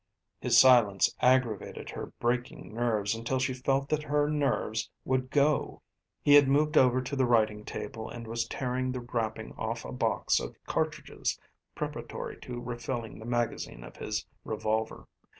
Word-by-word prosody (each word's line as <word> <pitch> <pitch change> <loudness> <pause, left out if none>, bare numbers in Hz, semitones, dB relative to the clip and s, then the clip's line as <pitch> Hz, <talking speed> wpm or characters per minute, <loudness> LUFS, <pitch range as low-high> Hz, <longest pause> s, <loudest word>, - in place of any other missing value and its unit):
His - - +5
silence 115 -7 +6
aggravated 125 -5 +1
her - - -5
breaking 120 -2 -2
nerves 110 -3 0
until 115 +3 -2
she 130 0 0
felt 135 +2 0
that 155 -1 +1
her 145 0 +1
nerves 140 -7 0 0.2
would 130 0 0
go. 145 +1 +1 0.4
He 145 - +5
had 145 -1 +8
moved 150 +2 +2
over 130 0 +5
to 140 +3 -4
the 130 -2 +2
writing 110 -3 +2
table 110 0 -6
and 120 -1 -7
was 115 +1 -2
tearing 130 +1 -2
the 125 - -4
wrapping 115 -2 -3
off - - -3
a - - -6
box - - +1
of - - -6
cartridges - - -2 0.4
preparatory - - -5
to 120 -1 -6
refilling 120 -2 -5
the 110 - -9
magazine 120 - -2
of - - -11
his - - -3 0.2
revolver. 110 +1 -2
125 Hz, 155 wpm, -29 LUFS, 115-130 Hz, 0.4 s, had